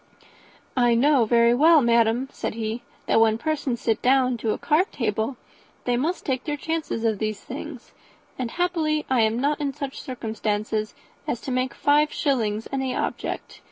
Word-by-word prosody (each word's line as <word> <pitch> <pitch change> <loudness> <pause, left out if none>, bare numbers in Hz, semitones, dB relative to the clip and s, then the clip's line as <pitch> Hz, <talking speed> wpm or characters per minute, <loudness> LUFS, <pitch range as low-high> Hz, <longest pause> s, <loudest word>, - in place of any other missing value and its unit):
"I 240 -2 +4
know 270 0 +4
very 235 +1 +4
well, 315 +5 +6
madam," 235 0 +3
said - - -4
he, 225 +1 -3 0.2
"that - - +3
when 220 -1 +4
persons 285 -4 -2
sit 225 -2 0
down 255 -1 +3
to 225 0 -3
a - - 0
card 320 +6 +1
table 220 +1 -2 0.5
they 245 - +1
must 315 +9 -1
take 260 -2 -1
their 295 -2 -3
chance 325 +1 -3
of 225 -3 -1
these 215 -2 -2
things, 275 -1 -8 0.4
and 250 -2 -3
happily 320 -2 0
I 255 -3 +4
am 220 +1 +2
not 290 +3 0
in 280 -2 -1
such 280 -2 -5
circumstances 215 -3 -3 0.3
as 240 - -1
to 265 - -5
make 255 +1 -1
five 295 +1 +3
shillings 225 -6 0
any 265 -1 -1
object. - - -4
250 Hz, 170 wpm, -24 LUFS, 225-290 Hz, 0.5 s, well